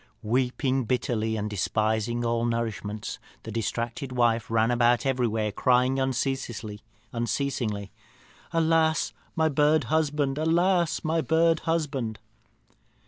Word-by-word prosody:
"Weeping 130 +3 0
bitterly, 110 -2 0
and 105 0 -2
despising 110 +4 0
all 115 0 0
nourishment, 110 -3 -3 0.2
the 110 - -7
distracted 115 +4 -3
wife 120 -4 +1
ran 115 +1 +2
about 120 +1 +3
everywhere, 115 -5 0
crying 125 +4 +2
unceasingly, 130 -5 -2 1.7
'Alas, 160 -1 +2 0.2
my 160 -1 +3
bird 150 +1 +3
husband! 150 -2 0
Alas, 170 +2 +2
my 160 0 +1
bird 165 +1 +3
husband!' 140 -9 -1
125 Hz, 100 wpm, -26 LUFS, 115-155 Hz, 1.7 s, about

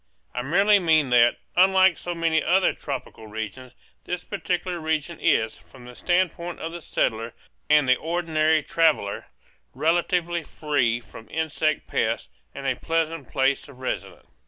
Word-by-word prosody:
I - - -2
merely 195 +10 +4
mean 160 -6 +3
that, 120 -1 +5 0.2
unlike 190 0 +5
so 175 0 -5
many 165 -1 +1
other 185 +1 +3
tropical 130 -5 -7
regions, 110 +4 -7 0.3
this 180 0 -4
particular 180 -3 -3
region 160 +1 -2
is, 110 0 +1
from 130 -2 -16
the 125 - -10
standpoint 175 +2 -1
of 165 - -5
the 170 0 -7
settler 115 -5 -1 0.3
and 150 -2 +5
the 130 0 +5
ordinary 160 -2 +1
traveller, 155 -13 +1 0.5
relatively 175 +1 +1
free 140 -7 0
from 115 -2 -14
insect 155 -1 -1
pests, - - -1 0.3
and 140 - -7
a 135 -2 +1
pleasant 165 -2 -2
place 135 +2 0
of 135 - -14
residence. 130 - -5
155 Hz, 145 wpm, -24 LUFS, 130-175 Hz, 0.5 s, that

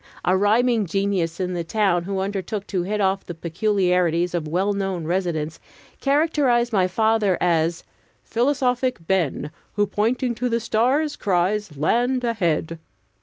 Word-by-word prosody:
A 185 - +3
rhyming 220 +2 +2
genius 190 -2 -1
in 180 -1 -2
the 175 -1 -2
town, 175 -1 +1
who 195 0 -2
undertook 200 +1 -3
to 185 -3 -2
hit 210 +4 -2
off 195 -1 +1
the 175 - -7
peculiarities 180 -1 +1
of 165 -3 -2
well 190 +6 0
known 195 -4 -2
residents, 165 -3 -2 0.4
characterized 275 -5 +2
my 185 -3 +3
father 220 -1 +2
as 165 -1 +1 0.4
"Philosophic 250 - 0
Ben, 165 -5 0 0.2
Who, 205 - +2
pointing 235 +5 0
to 245 +2 -2
the 230 0 +1
stars, 255 +7 +1
cries, 190 -2 0
Land 245 - +1
ahead!" 170 -8 -1
195 Hz, 140 wpm, -23 LUFS, 175-230 Hz, 0.4 s, A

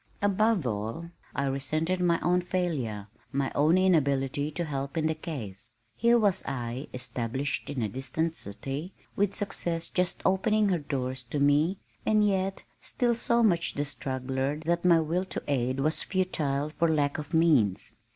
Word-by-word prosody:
Above 205 -3 +2
all, 115 +10 -3 0.2
I 140 - 0
resented 155 +7 -1
my 175 -2 +2
own 180 +2 +2
failure, 150 - -2 0.3
my 140 0 0
own 155 +5 +4
inability 145 -6 +2
to 170 +3 -3
help 140 0 -4
in 160 - +1
the 160 - +2
case. 125 - -7 0.3
Here 235 - +4
was 200 -4 +2
I, 125 0 -4
established 125 +2 -3
in 135 -5 -2
a - - +1
distant 135 +8 -2
city, 135 - -5 0.2
with 200 0 +1
success 170 -4 -2
just 180 -1 -1
opening 205 +2 +3
her 180 -3 +1
doors 130 -3 -3
to 140 +5 -3
me, 145 +6 +3 0.3
and 215 -1 +3
yet 195 -1 0 0.2
still 240 -1 0
so 235 0 +2
much 170 -6 +2
the 145 - -1
struggler 135 +1 -2
that 170 +1 +1
my 170 -2 +6
will 170 +4 -1
to - - -4
aid 130 -2 0
was 155 +3 +1
futile 155 -6 -1
for 165 +2 +1
lack 150 -2 +1
of 150 +1 -7
means. 140 - +3
155 Hz, 160 wpm, -28 LUFS, 135-180 Hz, 0.3 s, my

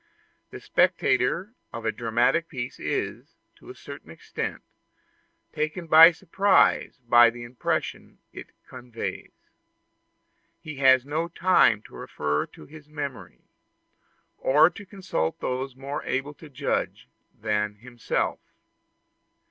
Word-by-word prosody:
The - - -9
spectator 370 - +1 0.2
of 115 -1 -7
a 110 - +1
dramatic 120 +8 +1
piece 130 -4 -6
is, - - -4 0.2
to - - -16
a 380 - -9
certain - - -11
extent, - - -6 0.9
taken 155 +3 -3
by 165 +1 +9
surprise 195 +3 +2
by 120 0 +7
the 120 0 -9
impression 120 +1 -4 0.2
it - - -9 0.2
conveys. 125 -2 -7 1.3
He 155 -2 -9
has 130 -2 +5
no 155 +4 -2
time 170 - +3
to - - -17
refer 75 0 -3
to - - -15
his 150 0 -15
memory, 145 -4 -7 1.0
or 150 +6 +4
to 200 +3 -12
consult 185 - -3
those 130 +1 -3
more 140 +2 -5
able 135 +3 -3
to 155 +1 -14
judge 140 +1 -3 0.3
than 105 -1 -1
himself. 120 +2 -3
135 Hz, 115 wpm, -25 LUFS, 120-165 Hz, 1.3 s, by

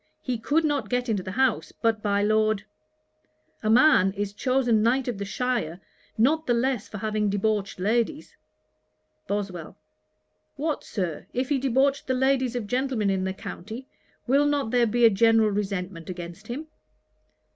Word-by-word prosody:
He 250 -3 -2
could 300 +8 +1
not 290 -2 -1
get 245 0 -1
into 205 -4 0
the 185 0 -6
house 260 -2 +1
but 225 -1 0
by 205 -1 +1
Lord. 215 -1 +2 1.0
A 215 - -1
man 225 -6 +5
is 200 0 -3
chosen 245 -1 +2
Knight 250 +4 +2
of 235 -5 -3
the 200 - -3
shire, 225 -7 -2 0.4
not 305 +8 +2
the 240 - +3
less 245 -2 0
for 210 - -7
having 215 0 -1
debauched 205 -1 -1
ladies.' 235 +10 -1 0.9
BOSWELL. 195 -5 -4 0.8
'What, 300 +1 -2
Sir, 180 -7 -4
if 255 +1 -1
he 285 -2 +2
debauched 270 +2 +1
the 260 - +1
ladies 260 -1 +1
of 240 -3 -2
gentlemen 250 -3 0
in 190 -1 -1
the 190 - -2
county, 220 +8 -8 0.4
will 280 +3 +3
not 285 -6 0
there 245 -1 +3
be 240 +2 +3
a - - +9
general 225 +1 +4
resentment 190 -4 -3
against 175 +3 -8
him?' 270 +7 -5
225 Hz, 160 wpm, -26 LUFS, 200-260 Hz, 1.0 s, a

